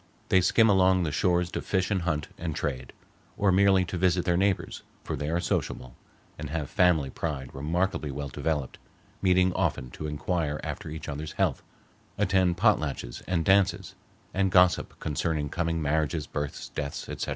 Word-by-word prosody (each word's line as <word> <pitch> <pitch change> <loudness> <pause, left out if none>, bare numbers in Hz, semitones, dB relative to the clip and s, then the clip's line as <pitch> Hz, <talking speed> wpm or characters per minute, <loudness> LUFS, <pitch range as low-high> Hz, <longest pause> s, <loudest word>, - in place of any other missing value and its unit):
They 95 - +5
skim 110 +5 +4
along 95 -2 +4
the 80 - -1
shores 90 +2 +1
to - - -3
fish 95 0 -1
and 95 -3 +1
hunt 80 -3 -1
and 80 -3 -4
trade, 65 -4 -3 0.5
or 100 -1 +3
merely 95 0 +4
to 90 0 -4
visit 90 -1 +2
their 90 -2 +2
neighbors, 95 +2 0 0.2
for - - -3
they 75 +2 -3
are 85 +2 +1
sociable, 65 -7 -2 0.4
and 75 -1 -5
have 75 -2 -3
family 90 -8 +3
pride 70 -5 -4
remarkably 80 +3 -1
well 70 +1 -4
developed, 75 -1 -3 0.4
meeting 90 -1 +3
often 80 -10 -1
to 75 - -6
inquire 75 0 -2
after - - -5
each 80 +1 -7
other's 75 +2 -5
health, - - 0 0.6
attend 95 -3 +2
potlatches 75 - 0
and 85 -3 0
dances, 95 0 +2 0.4
and 95 0 +2
gossip 90 0 +3
concerning 75 -1 -1
coming 85 0 -1
marriages, 75 0 0
births, 75 -1 -5
deaths, 70 -1 -5
etc. - - -4
85 Hz, 165 wpm, -27 LUFS, 75-95 Hz, 0.6 s, They